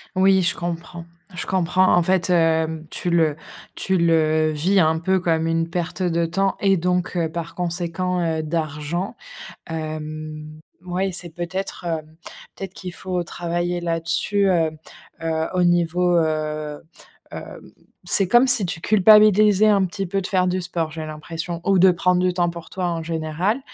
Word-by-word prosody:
Oui, 190 0 +4
je 180 +1 +1
comprends 170 0 -6 0.3
je - - -4
comprends. 185 0 +2
En 175 - +5
fait, 185 +1 +1
hem, 160 -2 +1
tu 175 - -3
le 160 -3 +2 0.4
tu 190 0 0
le 160 -2 +2
vis 180 +7 +2
un 160 -2 +3
peu 190 +3 +1
comme 165 -2 0
une 165 0 0
perte 175 +2 -4
de 170 -2 +1
temps 195 +4 0
et 195 -1 +3
donc 180 +1 -1
heu, 165 -2 0
par 170 +1 -6
conséquent, 180 +1 -2
heu, 160 -2 -1
d'argent, 155 +3 -3 0.5
hem, 155 -1 -6 0.2
mouais, 185 +1 -2
c'est 175 0 -5
peut-être, 175 +3 -5
heu, 160 -2 -1 0.6
peut-être 195 -1 -7
qu'il 180 -2 -8
faut 180 -2 -3
travailler 175 +1 -3
là-dessus, 170 +4 0
heu 165 -3 +2 0.5
heu, 160 0 -1
au 180 -1 +2
niveau, 175 0 +2
heu, 155 -2 -2 0.5
hem, - - -10 0.3
c'est 195 - +3
comme 240 +4 +5
si 250 -6 +4
tu 165 -1 -3
culpabilisais 215 0 +5
un 200 -2 +4
petit 195 +1 -4
peu 195 +2 -1
de - - -7
faire 185 -1 +1
du 185 +1 -1
sport, 170 -2 -2
j'ai 155 0 -6
l'impression 165 +2 -6
ou 195 -1 +3
de 185 +1 +7
prendre 180 +1 +1
du 180 0 +1
temps 175 -1 +1
pour 170 -1 -9
toi, 185 -1 -3
en 165 -1 -2
général. 165 - -1
175 Hz, 165 wpm, -22 LUFS, 160-185 Hz, 0.6 s, de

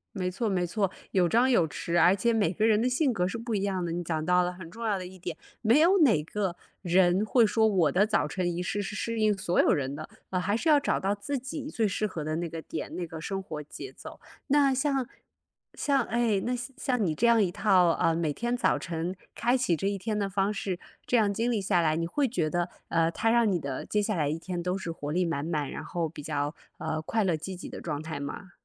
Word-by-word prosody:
没 185 -2 -1
错 220 +5 -2
没 180 -3 0
错， 195 +1 0 0.2
有 180 -3 +3
张 240 +7 +4
有 175 -10 +3
弛， 170 +3 -1
而 180 +4 +6
且 235 +4 +2
每 205 -7 +2
个 215 +4 +1
人 220 -1 +4
的 250 - +2
性 260 +2 +2
格 180 -5 0
是 230 - -4
不 230 0 -3
一 200 - 0
样 190 -3 -1
的， 170 - -2
你 175 +1 -2
讲 160 -2 -2
到 180 0 +4
了 180 0 -1
很 180 -2 -10
重 230 +5 -8
要 210 -3 +1
的 185 - -6
一 185 +1 -12
点。 175 -2 -5 0.3
没 235 +4 +5
有 365 +5 +5
哪 260 - +5
个 190 0 -2 0.3
人 180 +1 +3
会 230 +1 +4
说 220 +1 +3
我 175 -8 +3
的 195 +3 +4
早 215 -7 +1
晨 175 +3 -1
仪 170 - -3
式 205 +3 -2
是 205 +1 -5
适 230 +1 -2
应 215 -1 +4
所 185 -2 +1
有 - - +2
人 140 -3 -1
的， 155 +2 -7 0.2
呃， 185 - 0
还 200 +4 0
是 280 - -1
要 300 -2 +6
找 280 - +1
到 195 +2 0
自 270 +8 -3
己 275 +3 -6
最 230 -7 0
适 210 +2 0
合 160 -5 -5
的 155 +1 -2
那 170 +1 -2
个 165 0 -6
点， 160 - -6
那 180 - -3
个 160 -1 -8
生 195 +4 -3
活 160 -6 -6
节 150 - -9
奏。 - - -11 0.3
那 280 -1 +4
像 270 -1 0 0.7
像 275 -2 +1
哎， 225 -3 +1
那 245 +5 -1
像 245 +2 -7
像 255 -6 0
你 160 - 0
这 235 +9 +2
样 230 -1 +5
一 185 -4 +2
套， 190 -4 +4
嗯， 165 - +3
每 160 -3 0
天 240 +9 -1
早 250 - +2
晨 170 +1 -3 0.2
开 240 +2 +2
启 245 -10 +1
这 195 - -3
一 200 - -1
天 210 +2 -2
的 200 -1 0
方 195 +1 0
式， 190 -3 -3 0.3
这 245 - +2
样 210 -3 +3
经 230 +4 -1
历 220 - +1
下 185 -2 +2
来， 155 -2 +2
你 165 +1 -1
会 270 +12 0
觉 175 -11 -1
得， 175 +1 0 0.2
呃， 165 -1 +2
它 225 - +1
让 235 -2 +4
你 180 -3 0
的 140 -3 -4
接 210 - +1
下 210 -1 -1
来 150 -3 +1
一 155 +3 -2
天 180 0 -4
都 180 +2 -1
是 190 -3 -5
活 150 -3 -5
力 180 +3 +2
满 165 -4 -2
满， 150 -5 -1
然 - - -6
后 170 -2 -2
比 155 - -10
较， 145 0 -2 0.2
呃， 155 - -2
快 220 +8 0
乐 180 -5 +1
积 185 +5 -6
极 180 - -8
的 - - -8
状 150 -3 -4
态 160 -1 -5
吗？ 145 +6 -6
190 Hz, 285 characters per minute, -28 LUFS, 170-225 Hz, 0.7 s, 而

